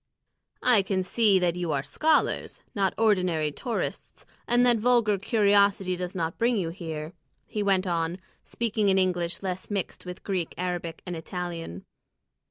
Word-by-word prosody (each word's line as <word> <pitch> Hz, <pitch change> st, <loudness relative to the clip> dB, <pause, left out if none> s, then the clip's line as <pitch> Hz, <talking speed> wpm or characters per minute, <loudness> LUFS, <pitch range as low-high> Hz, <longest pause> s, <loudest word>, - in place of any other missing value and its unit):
"I 240 Hz, -5 st, +6 dB
can 190 Hz, -1 st, -1 dB
see 205 Hz, +1 st, +3 dB
that 175 Hz, -2 st, +1 dB
you 175 Hz, -2 st, -2 dB
are 135 Hz, -1 st, -1 dB
scholars, 310 Hz, -, 0 dB
not 195 Hz, -4 st, 0 dB
ordinary 180 Hz, -8 st, +2 dB
tourists, 230 Hz, -, -5 dB, 0.2 s
and 245 Hz, +1 st, +4 dB
that 240 Hz, -1 st, +5 dB
vulgar 225 Hz, -3 st, +3 dB
curiosity 200 Hz, -3 st, +3 dB
does 180 Hz, +1 st, -5 dB
not 165 Hz, -2 st, -3 dB
bring 235 Hz, 0 st, +2 dB
you 175 Hz, -4 st, -1 dB
here," 160 Hz, -2 st, -6 dB, 0.3 s
he 210 Hz, -, -4 dB
went 195 Hz, -2 st, +2 dB
on, 170 Hz, -1 st, -1 dB, 0.3 s
speaking 220 Hz, -3 st, 0 dB
in 190 Hz, -, +4 dB
English 180 Hz, -1 st, 0 dB
less 185 Hz, -1 st, -4 dB
mixed 195 Hz, -2 st, -4 dB
with 180 Hz, 0 st, -8 dB
Greek, 185 Hz, -5 st, -2 dB
Arabic, 175 Hz, -2 st, -4 dB
and 180 Hz, -1 st, -4 dB
Italian. 165 Hz, -, -6 dB
185 Hz, 155 wpm, -27 LUFS, 175-210 Hz, 0.3 s, I